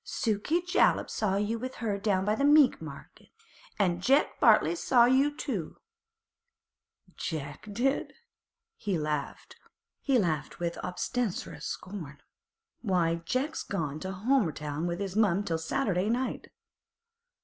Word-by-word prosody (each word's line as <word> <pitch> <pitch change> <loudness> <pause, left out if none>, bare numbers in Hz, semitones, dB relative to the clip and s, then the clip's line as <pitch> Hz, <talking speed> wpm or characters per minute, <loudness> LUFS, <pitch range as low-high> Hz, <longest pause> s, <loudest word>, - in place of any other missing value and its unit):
'Sukey 230 +10 0
Jollop 360 +3 +2
saw 200 -3 0
you 210 +3 -1
with 255 +2 -5
her 210 -4 -2
down 195 -2 +1
by 210 - +2
the 250 - -1
meat 290 -1 +5
market, - - -11 0.5
an' 175 -4 +1
Jeck 275 +8 +2
Bartley - - +5
saw 250 -8 +4
you 265 +4 +4
too.' 200 - -4 1.4
'Jeck 150 +3 -5
did?' 265 +7 0 0.6
He 200 -4 -1
laughed 150 -2 -4 1.0
with 170 -1 -3
obstreperous 180 -6 -3
scorn. 175 -7 -7 0.6
'Why, 170 -6 +1
Jeck's 275 - -1
gone 155 -6 -3
to 190 +4 -5
Homerton 175 - 0
to 170 0 -2
his 195 -1 -4
mother 205 -3 +3
till 165 -4 -2
Saturday 185 +3 0
night. 250 +3 -2
200 Hz, 120 wpm, -29 LUFS, 170-250 Hz, 1.4 s, meat